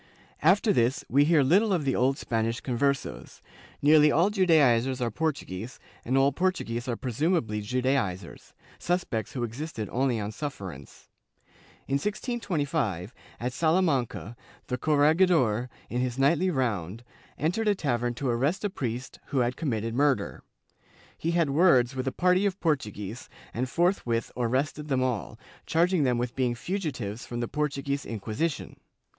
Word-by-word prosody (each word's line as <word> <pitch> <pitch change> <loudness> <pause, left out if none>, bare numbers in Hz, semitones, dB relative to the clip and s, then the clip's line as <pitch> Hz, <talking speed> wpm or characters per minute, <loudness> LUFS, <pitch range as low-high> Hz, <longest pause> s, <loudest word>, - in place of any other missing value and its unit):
After 200 +6 +4
this 120 -2 +1
we 140 +3 +4
hear 155 -2 +4
little 195 +10 +4
of 170 -6 +1
the 135 - +1
old 130 +3 +2
Spanish 115 -2 -1
Con 125 - -3
versos; 140 +2 -2 0.4
nearly 150 0 +6
all 170 +8 +3
Judaizers 140 - +3
are 120 -2 -1
Portuguese 125 - -3 0.3
and 130 +3 0
all 135 +1 +4
Portuguese 135 -8 -1
are 120 - -1
presumably 125 - -1
Judaizers 125 -4 -2
— - - -25
suspects 135 - -1
who 125 - -2
existed 120 -1 -4
only 125 -2 +1
on 105 0 -3
sufferance. 100 - -8 0.8
In 135 - +1
1625, 150 - -2 0.3
at 125 +1 -3
Salamanca, 155 - 0 0.3
the 125 - -2
corregidor, 150 - +3 0.2
in 125 +2 -2
his 125 -1 -2
nightly 160 +7 +3
round, 115 - -2 0.3
entered 180 +9 0
a 205 - +4
tavern 120 -7 -1
to 135 +3 -3
arrest 135 - 0
a 205 - -1
priest 125 -4 -5
who 135 -3 +1
had 120 +1 0
committed 115 -7 -2
murder. 135 - +1 0.7
He 165 - -3
had 165 -5 +2
words 135 -6 +4
with 130 0 -3
a - - +1
party 180 +5 +3
of 195 -1 -3
Portuguese 115 - -2 0.2
and 125 +2 -2
forthwith 125 -8 0
arrested 130 +5 -1
them 130 -3 +1
all, 125 -7 -2 0.3
charging 170 -1 +2
them 125 -2 +2
with 120 0 -3
being 125 -2 0
fugitives 125 - -4
from 120 - -4
the 120 - -1
Portuguese 140 -1 -2
Inquisition. 115 +8 -3
135 Hz, 150 wpm, -27 LUFS, 120-160 Hz, 0.8 s, nearly